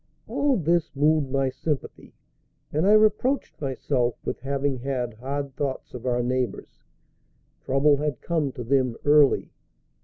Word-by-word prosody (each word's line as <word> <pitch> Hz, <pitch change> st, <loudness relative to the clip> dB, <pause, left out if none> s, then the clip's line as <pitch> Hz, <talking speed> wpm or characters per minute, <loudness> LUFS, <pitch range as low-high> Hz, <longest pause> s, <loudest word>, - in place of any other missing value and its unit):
All 280 Hz, -2 st, +1 dB
this 170 Hz, -1 st, +1 dB
moved 150 Hz, 0 st, +2 dB
my 135 Hz, 0 st, +1 dB
sympathy, 150 Hz, +1 st, -5 dB, 0.6 s
and 155 Hz, +6 st, +2 dB
I 210 Hz, -, +6 dB
reproached 215 Hz, -, +2 dB
myself 130 Hz, -3 st, -1 dB
with -, -, -3 dB
having 135 Hz, 0 st, -2 dB
had 125 Hz, -2 st, -3 dB
hard 135 Hz, +4 st, -5 dB
thoughts 135 Hz, -2 st, -4 dB
of 125 Hz, 0 st, -6 dB
our 120 Hz, -1 st, +1 dB
neighbors. 125 Hz, -3 st, -3 dB, 0.8 s
Trouble 140 Hz, +2 st, +3 dB
had 145 Hz, -3 st, -2 dB
come 160 Hz, -5 st, -1 dB
to 125 Hz, -, -6 dB
them 130 Hz, -1 st, +1 dB
early. 145 Hz, -1 st, +4 dB
140 Hz, 135 wpm, -25 LUFS, 130-150 Hz, 0.8 s, I